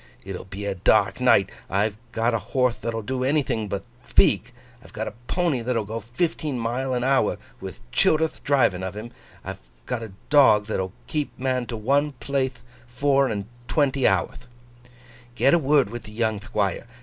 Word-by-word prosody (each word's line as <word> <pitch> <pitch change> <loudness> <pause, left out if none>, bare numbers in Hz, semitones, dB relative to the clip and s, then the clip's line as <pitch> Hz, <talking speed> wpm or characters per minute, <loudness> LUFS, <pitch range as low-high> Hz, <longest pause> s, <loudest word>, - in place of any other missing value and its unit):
It'll 95 -1 -6
be 95 +2 -7
a 100 - -1
dark 90 - +3
night; - - +4 0.2
I've 100 +2 +1 0.2
got 115 +1 +1
a 115 - +1
horthe 125 +4 0
that'll 115 -1 -3
do 130 +3 -2
anything 130 -6 +1
but 100 -1 -3 0.3
thpeak; - - +4 0.4
I've - - -16
got - - -3
a - - -5
pony 170 -8 +1
that'll 115 -2 -1
go 110 +3 -4
fifteen 135 - -2
mile 125 +3 -1
an 125 - -1
hour 135 +1 +2 0.2
with - - -8
Childerth 160 - +2
driving 130 -10 +2
of 95 +2 -5
him; 115 +3 -7 0.3
I've - - -6 0.3
got 125 -2 -3
a 110 -4 -8 0.2
dog 130 -8 +6
that'll 95 -3 -2
keep 150 -2 -2
a 130 - -9
man 130 -2 0
to 115 - -4
one 140 +6 +1
plathe 135 -1 -2 0.3
four 135 +2 +2
and 100 -4 -3 0.2
twenty 135 0 +2
hourth. 95 +5 0 0.9
Get 135 - +4
a 170 - +5
word 140 -6 +3
with 120 0 -7
the 105 - -11
young 110 -2 0
Thquire. 105 -1 -2
120 Hz, 180 wpm, -24 LUFS, 105-135 Hz, 0.9 s, dog